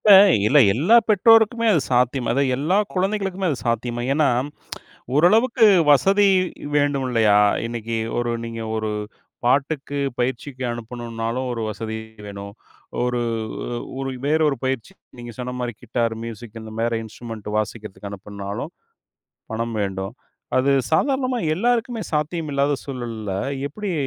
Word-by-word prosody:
இப்ப 210 - +3 0.4
இல்ல, 140 +7 +5 0.2
எல்லா 175 - +5
பெற்றோருக்குமே 225 +2 +5
அது 165 - +3
சாத்தியமா, 125 +1 +2
அதாவது 135 0 +1
எல்லா 155 +8 +1 0.2
குழந்தைகளுக்குமே 195 -1 -1
அது 140 - -2
சாத்தியமா? 120 +1 -1
ஏன்னா, 150 -1 +3 0.9
ஓரளவுக்கு 220 - +5 0.3
வசதி 195 +8 +5 0.5
வேண்டும் 145 -2 +1
இல்லையா? 110 -4 +4 0.3
இன்னைக்கு 115 -1 -4 0.2
ஒரு 120 0 -1
நீங்க 115 0 -6
ஒரு 110 0 -2 0.6
பாட்டுக்கு 140 +2 +1 0.2
பயிற்சிக்கு 130 +1 -2
அனுப்பனும்னாலும் 120 +1 -4
ஒரு 115 - -4
வசதி 110 +1 -5 0.3
வேணும். 100 0 -8 0.5
ஒரு 125 0 0 0.8
ஒரு 135 0 -2 0.2
வேறொரு 150 -1 +2
பயிற்சி 130 - -2 0.3
நீங்க 120 0 -7
சொன்ன 125 0 -4
மாரி 120 -1 -3
கிட்டார், 115 -1 -1
மியூசிக் 115 0 -8
இந்த 110 0 -9
மாரி 115 0 0
இன்ஸ்ட்ருமென்ட் 110 -1 -8
வாசிக்கிறதுக்கு 110 -1 -4
அனுப்பனும்னாலும் 100 - -6 0.8
பணம் 115 +1 -2
வேண்டும். 95 +1 -4 0.4
அது 135 +2 +2 0.2
சாதாரணமா 260 - +1 0.2
எல்லாருக்குமே 235 +3 0
சாத்தியமில்லாத 150 -2 0
சூழல்ல, 115 -6 -5 0.4
எப்டி 200 +6 -4
125 Hz, 120 wpm, -22 LUFS, 115-160 Hz, 0.9 s, இல்ல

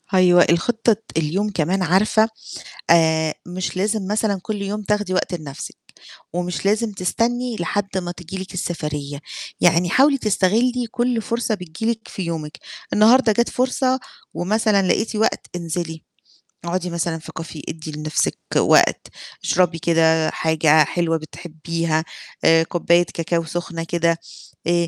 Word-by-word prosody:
أيوه، 180 -1 +6
الخطة 225 +7 +2
الت 220 -4 -4
اليوم 170 +7 0
كمان 185 0 0
عارفة 210 +5 +3 0.6
آآ 160 -2 +4
مش 180 +1 -4
لازم 205 0 0
مثلًا 210 -1 0
كلّ 210 +1 -4
يوم 205 +2 -3
تاخدي 210 -2 -1
وقت 185 +1 0
لنَفْسِك، 150 -5 -7 0.6
ومش 180 +1 -3
لازم 215 +2 +1
تستني 230 +6 -1
لحد 195 +3 -2
ما 175 -2 -3
تيجي 175 +1 -8
لِك 190 0 -7
السفرية، 150 -5 -4 0.4
يعني 175 0 +4
حاولي 275 +7 +4
تستغلّي 230 +3 +1
كلّ 240 -1 0
فرصة 235 -1 -1
بتيجي 180 +4 -3
لِك 225 -1 -7
في 190 - -5
يومِك، 165 -1 -5 0.4
النهارده 230 +3 +5
جات 235 +3 +1
فرصة 255 +1 +1 0.3
ومثلًا 210 +2 +2
لقيتِ 220 +4 0
وقت 220 +1 0
انزلي، 165 -1 -4 0.6
اقعدي 180 +1 -2
مثلًا 170 -1 -2
في 160 - -11
Caffe، 160 -2 -8
ادّي 160 0 -6
لنفسِك 155 +1 -1 0.2
وقت، - - +4 0.4
اشربي 175 -2 +2
كده 160 -1 +3
حاجة 160 -1 +3
حلوة 165 +2 0
بتحبيها، 160 0 -3 0.4
آآ 165 0 +6
كوباية 170 +1 +2
كاكاو 165 0 -1
سُخنة 165 0 -4
كده، 170 0 +1 0.5
آآ 170 0 +2
180 Hz, 140 wpm, -21 LUFS, 165-210 Hz, 0.6 s, أيوه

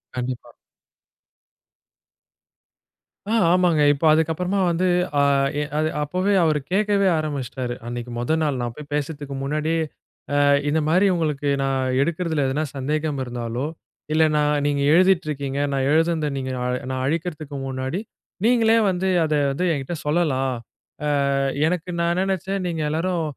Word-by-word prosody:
கண்டிப்பா. 125 -1 -4 2.8
ஆ - - +2 0.2
ஆமாங்க. 175 -4 +3
இப்போ 145 +3 -2
அதுக்கப்புறமா 165 +5 +1
வந்து, 180 +2 +1 0.3
அ - - +5 0.4
எ - - 0
அது 155 0 +1
அப்பவே 185 +7 0
அவரு 155 -2 +2
கேட்கவே 200 0 +2
ஆரம்பிச்சிட்டாரு. 135 -5 -3
அன்னைக்கு 120 0 -5
மொதல் 155 +7 0
நாள் 140 -4 0
நான் 120 -1 -3
போயி 150 - -9
பேசத்துக்கு 145 -1 -3
முன்னாடியே 155 +3 0 0.6
அ - - +4 0.3
இந்த 155 +2 +2
மாரி, 180 +5 +4
"உங்களுக்கு 150 -3 -1
நான் 130 -1 0
எடுக்கிறதில 160 -1 0
எதனா 150 +4 -1
சந்தேகம் 150 +1 -1
இருந்தாலோ, 120 +1 -4 0.5
இல்ல 160 +1 +4
நான் 150 -1 +2
நீங்க 145 -1 0
எழுதிட்டு 185 0 +4
இருக்கீங்க, 140 -1 -3
நான் 135 -1 0
எழுதுனது 160 -1 +2
நீங்க 130 -1 -3
நா 125 - -2 0.3
நான் 130 0 -2
அழிக்கிறதுக்கு 155 -1 -3
முன்னாடி 130 +6 -3 0.5
நீங்களே 230 -1 +4
வந்து, 185 0 -1 0.2
அத 155 -1 0 0.2
வந்து 180 +7 -1
என்கிட்ட 140 +3 -4
சொல்லலாம். 145 -5 +1 0.8
அ - - +1 0.3
எனக்கு 180 +1 -2
நான் 170 0 +2
என்ன 180 - 0
நெனச்சேன். 190 +1 -3
நீங்க 165 -2 -2
எல்லோரும் 165 +2 -1
155 Hz, 140 wpm, -23 LUFS, 135-170 Hz, 2.8 s, அ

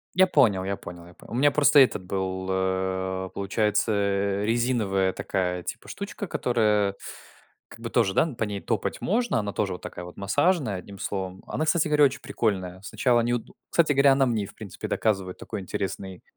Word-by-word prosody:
Я 185 0 +6
понял 110 - +3
я 100 0 -2
понял 85 -1 -10
я 85 - -15
по - - -18
У - - -8
меня 145 +4 +4
просто 145 0 +5
этот 130 -7 +5
был, 95 0 -3
э, 95 0 -1
получается, 105 +2 +1
э, 100 0 0
резиновая 110 -5 +1
такая 90 -1 -2
типа 110 - -7
штучка, 200 0 -6
которая 105 - +1 0.7
как - - -13
бы - - -4
тоже, 95 - +2
да, - - +5
н 150 -7 -6
по 110 - 0
ней 100 -2 -4
топать - - -2
можно. 235 - +1
Она 100 -1 -3
тоже 95 - -1
вот 90 - -10
такая 90 - -7
вот 90 - -11
массажная, 135 - +1
одним 100 +2 -10
словом. 95 -1 -4
Она, 155 - -2
кстати 160 -1 +2
говоря, 150 -1 +5
очень 135 -1 +1
прикольная. 95 -4 -2
Сначало 120 +3 +2
не 120 +1 0
удо 120 - -5 0.2
Кстати 160 -3 +3
говоря, 140 0 +5
она 135 0 +3
мне 115 -4 0
и - - -6
в 100 - -14
принципе 105 -4 -7
доказывает 95 -4 -1
такой 105 -3 -6
интересный, 95 -1 -5
100 Hz, 200 wpm, -26 LUFS, 95-125 Hz, 0.7 s, Я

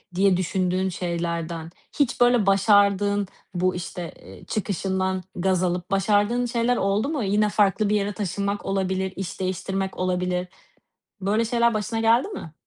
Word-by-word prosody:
diye 190 -1 +4
düşündüğün 185 +1 0
şeylerden 170 -2 -3 0.3
hiç 255 -3 +1
böyle 245 -4 +5
başardığın, 200 0 +3 0.3
bu, 180 +1 +1
işte, 175 -1 -6
ııı, 95 0 -13
çıkışından 190 -2 -1
gaz 185 0 +1
alıp 180 0 -2
başardığın 205 +5 +2
şeyler 240 0 +1
oldu 200 +7 +1
mu? 290 -8 -1
Yine 210 +2 +2
farklı 205 0 +2
bir 210 - +2
yere 205 0 0
taşınmak 200 +1 -3
olabilir, 190 -1 -1
iş 190 -1 -5
değiştirmek 190 +1 -2
olabilir. 180 0 -1 0.7
Böyle 210 +4 +1
şeyler 235 0 +2
başına 215 +2 -2
geldi 230 - +3
mi? 165 - -8
195 Hz, 140 wpm, -24 LUFS, 185-210 Hz, 0.7 s, böyle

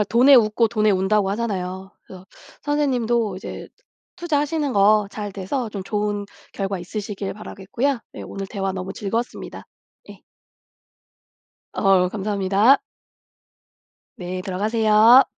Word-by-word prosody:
정말 - - 0
"돈에 250 +6 +5
웃고 230 -1 +4
돈에 215 -2 +2
운다."고 195 +1 +2
하잖아요. 190 -3 -3 0.2
그래서 185 0 -12 0.4
선생님도 240 -8 0
이제 195 - -8 0.5
투자하시는 300 -4 -1
거 205 0 +4
잘 205 -1 -6
돼서 215 +6 -3
좀 200 -2 -5
좋은 205 0 -2 0.3
결과 195 -1 -3
있으시길 200 +2 -5
바라겠고요. 225 +6 -3
네 - - -8
오늘 195 0 -6
대화 195 -3 -3
너무 185 0 -5
즐거웠습니다. 225 +5 -4 0.5
예. - - -13 1.5
어우 190 -3 +3
감사합니다. 205 +5 +2 1.4
네 180 0 -5
들어가세요. 215 +5 +5
210 Hz, 290 characters per minute, -22 LUFS, 195-235 Hz, 1.5 s, 돈에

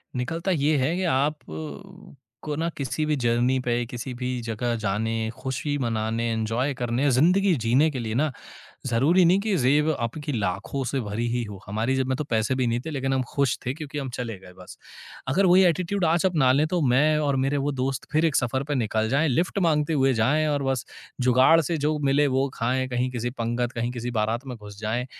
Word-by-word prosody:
निकलता 165 +9 -2
ये 155 -2 +2
है 140 +6 +1
कि 185 - -2
आपको 150 - -5
ना 165 +3 -1
किसी 140 +2 -2
भी 150 0 +1
जर्नी 120 0 +1
पे, 120 -1 -1
किसी 120 +2 -6
भी 125 +1 -4
जगह 115 +1 -2
जाने, 110 +1 -1
खुशी 140 +2 -3
मनाने, 115 -2 -1
एन्जॉय 115 +5 -1
करने, 125 +2 0
ज़िंदगी 180 +9 +4
जीने 125 +5 +3
के 135 - -4
लिए 110 -2 -3
ना 150 +4 +1 0.6
ज़रूरी 140 +10 +3
नहीं 180 +3 +5
कि 210 0 -1
ज़ेब 150 +2 +3
आपकी 145 +6 -3
लाखों 100 +4 -2
से 135 - -1
भरी 110 +1 -3
ही 120 0 0
हो। 100 -3 -9
हमारी 110 +6 -1
जेब 130 -1 0
में 130 - 0
तो 150 - -3
पैसे 115 -1 0
भी 130 -1 0
नहीं 120 +1 0
थे - - -3
लेकिन 135 -2 -2
हम 130 -1 +1
खुश 140 -3 +1
थे 125 - -1
क्योंकि 150 -1 -6
हम 135 -2 -4
चले 115 -5 -4
गए 90 -1 -14
बस। 90 - -12 0.5
अगर 185 +9 +3
वही 185 +1 +6
एटीट्यूड 180 +3 +1
आज 165 +3 +2
अपना 150 -8 +3
लें 145 +4 +3
तो 175 +2 -1
मैं 150 +4 +3
और 145 -2 +1
मेरे 140 +1 0
वो 145 - 0
दोस्त 135 0 -2
फिर 155 +2 +2
एक 155 - +1
सफ़र 130 +1 0
पे 145 - 0
निकल 110 -3 0
जाएँ, 140 +6 +2
लिफ्ट 170 +9 0
माँगते 160 -4 +2
हुए 135 -3 +3
जाएँ 140 +8 +2
और 145 -1 0
बस 135 -1 -1 0.3
जुगाड़ 130 +6 +5
से 165 +2 -1
जो 155 0 0
मिले 145 0 +2
वो 135 0 +1
खाएँ, 130 +2 -1
कहीं 125 0 -1
किसी 120 -1 -3
पंगत, 120 0 -2
कहीं 120 0 -2
किसी 120 0 -4
बारात 115 +3 -1
में 125 -2 -6
घुस 105 -2 -12
जाएँ 115 +3 -2
130 Hz, 210 wpm, -25 LUFS, 120-150 Hz, 0.6 s, वही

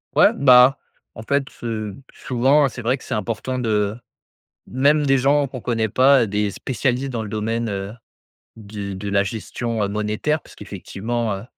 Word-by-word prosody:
Ouais, - - +6
bah, 130 0 +6 0.4
en - - -8
fait, 140 +3 0 0.2
heu, 110 -4 -4 0.2
souvent 135 +4 +2
c'est 120 -1 -7
vrai 125 +4 0
que - - -16
c'est - - -4
important 115 +4 -3
de 105 -3 0 0.7
même 145 +4 +2
des 135 -1 +4
gens 140 +2 +2
qu'on 130 -2 -8
connaît 115 -3 -1
pas. 130 +1 +4
Des 105 0 -1
spécialistes 130 +3 -2
dans 115 -3 -3
le 105 - -7
domaine, 115 +2 -2
heu, 100 +1 -4 0.6
d 100 -2 -7
de 100 +2 -6
la 100 0 +3
gestion, 115 +2 -4
heu, - - -2
monétaire 105 +9 -1
parce - - -17
qu'effectivement, 115 +1 -4
heu, 95 - -9
115 Hz, 170 wpm, -21 LUFS, 105-130 Hz, 0.7 s, Ouais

